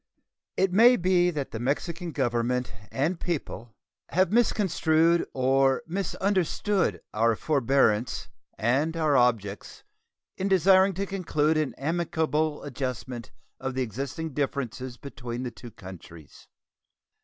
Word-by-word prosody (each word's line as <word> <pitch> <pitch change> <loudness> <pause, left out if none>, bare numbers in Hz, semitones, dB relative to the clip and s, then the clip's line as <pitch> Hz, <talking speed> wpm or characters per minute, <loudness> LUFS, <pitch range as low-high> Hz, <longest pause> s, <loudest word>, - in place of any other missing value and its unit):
It 190 -1 +2
may 235 +5 +7
be 180 -2 +3
that 150 -5 -4
the 110 - -5
Mexican 165 +7 -2
Government 125 -2 -1 0.2
and 160 +6 -1
people 140 -8 -4 0.4
have 185 0 +2
misconstrued 170 -7 +2
or 135 +1 +2
misunderstood 195 +2 0
our 115 +1 +2
forbearance 130 -5 +1 0.3
and 140 +9 +1
our 155 -3 +2
objects 115 -6 0 0.6
in 190 - 0
desiring 190 0 +5
to 200 +2 -2
conclude 160 -5 0
an 155 -3 -1
amicable 160 0 -1
adjustment 125 -4 -5 0.3
of 130 -1 -4
the 130 - +1
existing 135 - -5
differences 130 -3 -3
between 125 -3 -6
the 125 - -4
two 120 +1 -11
countries. 85 -6 -13
145 Hz, 115 wpm, -27 LUFS, 125-175 Hz, 0.6 s, may